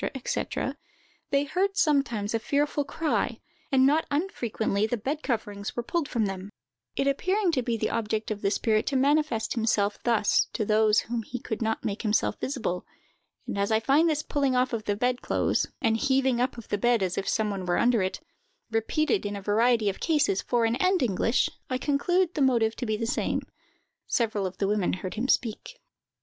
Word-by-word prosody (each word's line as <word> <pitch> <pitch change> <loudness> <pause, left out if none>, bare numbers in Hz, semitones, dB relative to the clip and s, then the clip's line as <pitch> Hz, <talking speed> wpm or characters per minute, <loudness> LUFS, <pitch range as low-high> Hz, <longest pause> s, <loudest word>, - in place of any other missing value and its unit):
&c., 265 - -2 0.9
they 280 0 +2
heard 385 +7 -1
sometimes 255 - +1
a 225 - +1
fearful 290 +4 0
cry, 310 +2 -1 0.3
and 265 -1 +5
not 300 +4 +3
unfrequently 235 - -1
the 245 - -1
bed 280 +8 -3
coverings 205 -6 -3
were 240 - -2
pulled 330 +3 -1
from 230 -3 0
them; 195 0 -5 0.5
it 275 - 0
appearing 370 +7 +1
to 270 -6 +1
be 235 -1 -1
the - - -1
object 220 -1 -2
of 205 -1 -3
the 195 - +2
spirit 215 +1 +1
to 280 - 0
manifest 280 -3 +2
himself 220 -3 +1
thus 225 -4 +3
to 215 - -1
those 215 0 +4
to - - -15
whom 235 -1 -1
he 245 +3 -6
could 220 -1 -5
not 220 0 -1
make 205 0 -2
himself 215 -2 0
visible; 235 -10 -2 0.6
and 200 - -4
as 200 +2 0
I 220 - +4
find 285 +9 +3
this 305 -1 0
pulling 280 -4 0
off 250 0 +2
the 215 -3 -1
bed 250 +3 0
clothes, - - 0 0.2
and 225 -1 +3
heaving 265 -1 +2
up 255 +1 0
the 215 -3 -4
bed 240 -2 +3
as 185 -1 -1
if 195 - -2
some 215 -2 0
one 190 -2 -4
were 175 - +2
under 235 -3 +3
it, 185 +8 -2 0.5
repeated 310 - +1
in 205 0 -3
a - - -4
variety 225 +2 +3
of 195 - -1
cases, 295 - +2
foreign 235 -1 +1
and 370 -1 +2
English, 230 +2 +2 0.2
I 255 - 0
conclude 350 +7 +1
the 300 - -2
motive 235 -4 +3
to 245 - -3
be 215 0 0
the 230 - -2
same. 230 - -1 0.6
Several 215 -5 0
of 185 0 -9
the 195 - 0
women 205 -2 +1
heard 185 0 -4
him 235 +4 -2
speak. 260 - -1
235 Hz, 195 wpm, -27 LUFS, 215-280 Hz, 0.9 s, and